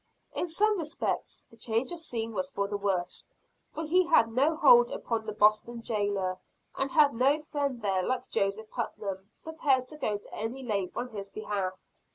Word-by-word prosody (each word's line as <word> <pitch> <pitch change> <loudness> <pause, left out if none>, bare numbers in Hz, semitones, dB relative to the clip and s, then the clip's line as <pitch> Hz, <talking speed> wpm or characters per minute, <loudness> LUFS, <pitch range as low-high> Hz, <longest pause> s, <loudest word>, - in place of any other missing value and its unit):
In 350 - -2
some 415 +4 +2
respects 315 0 -3
the 230 - -17
change 230 +6 -1
of 345 - -5
scene 230 -7 -3
was 185 -2 -2
for 200 +1 -2
the 205 - -3
worse; 190 -3 -2 0.4
for 320 - -4
he 360 +3 +3
had 230 -9 +5
no 280 +7 +2
hold 485 +8 +7
upon 230 - -3
the - - -1
Boston 215 +3 +2
jailer, 200 -4 -1 0.4
and 270 - -1
had 295 -1 +5
no 270 +6 +3
friend 285 -5 -3
there 190 -2 +1
like 255 +7 -2
Joseph 205 +2 -1
Putnam, 195 -1 -4
prepared 280 -5 +1
to 305 - -5
go 210 -8 -1
to 205 - -15
any 240 +5 -4
length 200 -6 -2
on 245 - -2
his 200 -3 -7
behalf. 200 -3 -4
230 Hz, 185 wpm, -29 LUFS, 205-295 Hz, 0.4 s, hold